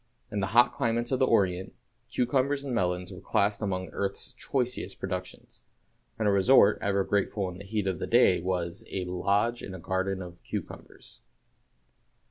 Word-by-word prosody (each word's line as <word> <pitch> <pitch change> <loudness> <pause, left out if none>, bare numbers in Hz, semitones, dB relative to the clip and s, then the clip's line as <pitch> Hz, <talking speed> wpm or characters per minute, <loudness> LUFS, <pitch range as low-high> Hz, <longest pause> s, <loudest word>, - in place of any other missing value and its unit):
In 105 - -2
the 95 - 0
hot 120 0 +6
climates 120 +1 -1
of 130 - +1
the 130 - +4
Orient, 95 -1 +1 0.3
cucumbers 135 +3 0
and 135 - -3
melons 90 -5 -1
were - - -10
classed 100 +1 +1
among 95 -3 -2
earth's 100 +3 -4
choicest 125 -7 -2
productions; 90 -1 -6 0.6
and 110 -1 0
a - - +4
resort 100 +1 +5
ever 100 -1 +1
grateful 100 0 0
in 90 0 -9
the - - -8
heat 105 0 -2
of 95 -3 -1
the - - -3
day 115 -7 +4
was 90 -1 -2
"a 95 -2 -3
lodge 100 +6 0
in 95 - -7
a - - -8
garden 95 +2 -2
of 90 -1 -11
cucumbers." - - -8
100 Hz, 170 wpm, -28 LUFS, 95-115 Hz, 0.6 s, hot